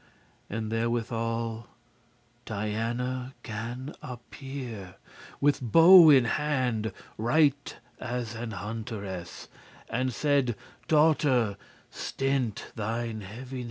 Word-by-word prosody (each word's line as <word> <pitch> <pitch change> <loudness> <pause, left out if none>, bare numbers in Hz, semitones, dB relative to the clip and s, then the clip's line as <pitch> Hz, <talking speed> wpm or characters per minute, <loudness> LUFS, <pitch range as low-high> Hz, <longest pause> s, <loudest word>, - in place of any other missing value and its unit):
And 110 +1 -3
therewithal 115 0 -1 0.8
Diana 120 +5 -3
gan 120 +5 -5
appear 125 -5 -8 0.4
With 145 -1 +2
bow 165 - +9
in 135 -4 +7
hand, 125 -5 0 0.3
right 140 +4 +2 0.2
as 120 -2 -3
an 115 0 -5
hunteress, 105 -4 -6 0.4
And 130 +3 0
saide; 140 -3 +1 0.3
"Daughter, 150 -8 +3 0.4
stint* 135 -5 -2
thine 115 0 -3
heaviness. 125 +7 -7
120 Hz, 85 wpm, -28 LUFS, 110-135 Hz, 0.8 s, bow